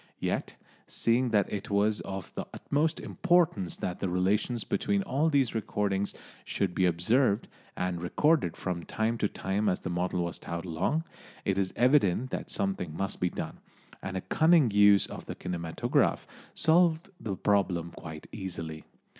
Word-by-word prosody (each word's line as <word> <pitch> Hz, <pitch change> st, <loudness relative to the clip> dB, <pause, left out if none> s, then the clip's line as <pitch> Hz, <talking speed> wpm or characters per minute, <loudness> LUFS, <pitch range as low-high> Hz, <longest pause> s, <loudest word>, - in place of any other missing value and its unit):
Yet, -, -, -2 dB, 0.3 s
seeing 120 Hz, +2 st, +1 dB
that 105 Hz, -3 st, +1 dB
it 100 Hz, -, -4 dB
was 105 Hz, +1 st, +2 dB
of 95 Hz, -2 st, -6 dB
the -, -, -5 dB
utmost 155 Hz, +3 st, 0 dB
importance 170 Hz, -, +1 dB
that 90 Hz, -, -3 dB
the 95 Hz, -, -1 dB
relations 105 Hz, +6 st, +1 dB
between 100 Hz, -1 st, 0 dB
all 145 Hz, +9 st, +1 dB
these 140 Hz, -6 st, +2 dB
things 100 Hz, -2 st, -1 dB, 0.3 s
should 95 Hz, -3 st, -1 dB
be 90 Hz, +1 st, +3 dB
observed, 100 Hz, +6 st, +2 dB, 0.3 s
and 90 Hz, -1 st, -2 dB
recorded 145 Hz, -, +2 dB
from 90 Hz, -2 st, -3 dB
time 115 Hz, +4 st, -1 dB
to -, -, +2 dB
time 100 Hz, +2 st, -1 dB
as 90 Hz, -, -1 dB
the -, -, -4 dB
model 90 Hz, 0 st, 0 dB
was 85 Hz, -, -4 dB
towed 85 Hz, +1 st, -5 dB
along, 90 Hz, -, 0 dB, 0.4 s
it 100 Hz, -1 st, +1 dB
is 95 Hz, -1 st, 0 dB
evident 125 Hz, -2 st, +3 dB
that -, -, -4 dB
something 95 Hz, -5 st, -2 dB
must 95 Hz, 0 st, -2 dB
be 90 Hz, -, +1 dB
done, -, -, -6 dB, 0.4 s
and 95 Hz, 0 st, -4 dB
a -, -, -2 dB
cunning 160 Hz, -, +4 dB
use 100 Hz, -1 st, +6 dB
of -, -, -9 dB
the -, -, -5 dB
kinematograph 85 Hz, -2 st, 0 dB, 0.3 s
solved 165 Hz, +2 st, +3 dB
the 100 Hz, -4 st, -3 dB
problem 90 Hz, -4 st, +1 dB
quite 80 Hz, -2 st, -9 dB
easily. 85 Hz, -6 st, -6 dB
100 Hz, 160 wpm, -29 LUFS, 90-120 Hz, 0.4 s, use